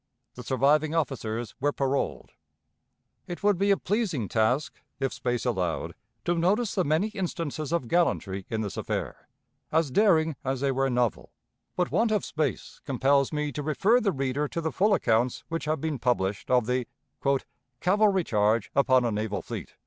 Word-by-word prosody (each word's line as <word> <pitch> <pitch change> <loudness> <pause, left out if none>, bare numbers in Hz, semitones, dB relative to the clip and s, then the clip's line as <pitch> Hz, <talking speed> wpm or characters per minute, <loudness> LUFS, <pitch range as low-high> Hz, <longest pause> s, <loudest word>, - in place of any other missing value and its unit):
The 125 - -9
surviving 145 +5 +2
officers 120 -7 -2
were 145 +2 +1
paroled. 135 -1 -2 1.0
It 175 +2 -7
would 205 -3 +3
be 200 +1 +2
a 200 - +5
pleasing 185 - -1
task, 120 +5 0 0.2
if 135 -1 -1
space 125 -1 -2
allowed, 95 -9 -1 0.3
to 175 - +2
notice 195 +7 +1
the 185 - +1
many 160 +8 +1
instances 165 -7 -4
of 170 -8 0
gallantry 100 - 0
in 110 -2 -1
this 105 -3 -4
affair, - - -4 0.4
as 160 -3 +2
daring 160 -5 +3
as 135 -1 -1
they 140 0 +1
were 135 +1 +1
novel, 120 -3 -1 0.4
but 180 -1 0
want 230 0 +2
of 210 -2 0
space 155 -3 -3
compels 140 +1 +2
me 150 -1 -1
to 145 - -4
refer 195 - +2
the 200 - +2
reader 135 +1 -1
to 170 - -4
the 160 -1 -2
full 205 +2 +3
accounts 115 -2 +1
which 165 -1 -3
have 155 0 0
been 155 -2 -2
published 105 -6 0
of 125 -2 +3
the 125 0 -1 0.9
"cavalry 195 0 +3
charge 105 -3 +1
upon 130 -2 +4
a 120 - +1
naval 105 0 -2
fleet." - - -7
140 Hz, 170 wpm, -27 LUFS, 125-170 Hz, 1.0 s, a